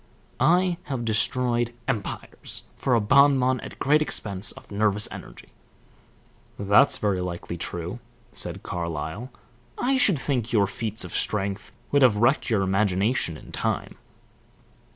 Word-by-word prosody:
I 180 +1 +3
have 130 -4 -4
destroyed 120 +1 +1
empires 115 -7 -4
for 125 - +1
a - - +4
bon 140 +6 +5
bon 130 0 +1
at - - -10
great 150 +3 +3
expense 100 -8 +1
of - - -14
nervous 105 0 +2
energy." - - -10 1.1
"That's 100 +7 +4
very 100 -3 0
likely 85 -1 -5
true," 85 - -5 0.3
said - - -5
Carlyle. 85 - -4 0.5
"I 265 +2 +1
should 205 - +4
think 125 -5 -2
your 105 -4 +3
feats 110 +1 -2
of - - -7
strength 100 -1 -1 0.2
would 145 - +3
have 125 -5 +5
wrecked 120 +7 +2
your 105 -4 +2
imagination 95 0 +1
in - - -14
time." - - -2
110 Hz, 135 wpm, -25 LUFS, 100-130 Hz, 1.1 s, bon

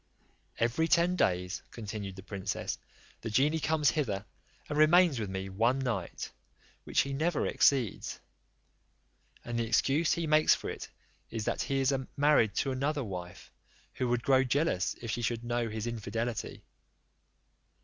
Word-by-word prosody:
"Every 120 +8 +1
ten 175 +2 +3
days," 90 - 0
continued 105 -3 -6
the 95 - -10
princess, 100 0 -4 0.4
"the 115 - -4
genie 145 +8 +2
comes 155 -1 +2
hither, 105 -10 -2 0.4
and 150 - -3
remains 155 -2 +5
with 105 -3 -3
me 95 0 -4
one 115 +7 +1
night, 120 -10 -3 0.5
which - - +2
he 140 0 -3
never 160 +3 0
exceeds; 130 -7 +1 1.3
and 120 0 -2
the 115 - 0
excuse 140 +8 +2
he 170 - -1
makes 155 0 +5
for - - -5
it - - -7 0.4
is, 110 -2 -4
that - - -1
he 135 0 0
is 135 +1 +2 0.2
married 145 -7 +4
to 135 - 0
another 140 +2 -1
wife, 90 -4 -7 0.4
who 125 - -1
would 120 0 0
grow 135 -1 +4
jealous 135 - +1
if 115 - -3
she 120 - -2
should 115 0 -1
know 120 -1 -1
his 110 0 -4
infidelity. 115 0 -3
120 Hz, 150 wpm, -31 LUFS, 105-145 Hz, 1.3 s, remains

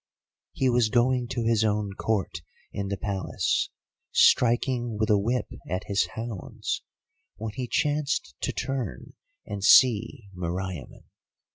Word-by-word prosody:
"He 130 - +1
was 120 -3 +3
going 125 +1 +2
to 120 0 -2
his 115 -1 +2
own 105 -2 0
Court 95 -5 -2 0.3
in 100 0 -3
the 100 0 -2
Palace, 95 -1 -1 0.4
striking 120 -1 +3
with 110 0 +1
a 105 - +5
whip 120 +5 0 0.2
at 90 +3 -2
his 100 -1 +1
hounds, 115 -4 -4 0.5
when 110 -1 -5
he 125 0 -4
chanced 145 - 0
to - - 0
turn 130 -7 -4 0.3
and 100 -1 -5
see 115 0 +5
Meriamun. 90 -2 -5
110 Hz, 130 wpm, -27 LUFS, 100-125 Hz, 0.5 s, a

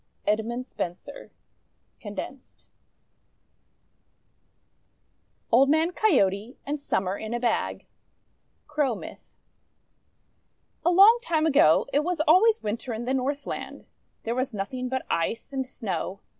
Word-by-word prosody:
EDMUND 225 +4 -1
SPENSER 185 +7 -7 0.7
(condensed) 220 +5 -9 2.9
OLD 265 +4 +5
MAN 315 +3 +3
COYOTE 235 - +1
AND 290 0 -3
SUMMER 190 -7 -1
IN 220 +2 -4
A - - -1
BAG 235 -2 -1 0.8
Crow 295 -5 0
Myth - - -11 1.5
A - - +3
LONG 400 +7 +7
time 320 -10 0
ago, 275 - +5
it 290 - +3
was 350 0 -2
always 380 +9 +4
Winter 230 +3 -3
in 235 +2 -5
the 260 - -1
Northland. 275 +2 -4 0.4
There 230 - -2
was 255 -1 -2
nothing 250 +6 -4
but 260 0 -3
Ice 225 +10 -2
and 265 -1 -2
Snow. 200 -5 -4
255 Hz, 115 wpm, -26 LUFS, 220-300 Hz, 2.9 s, LONG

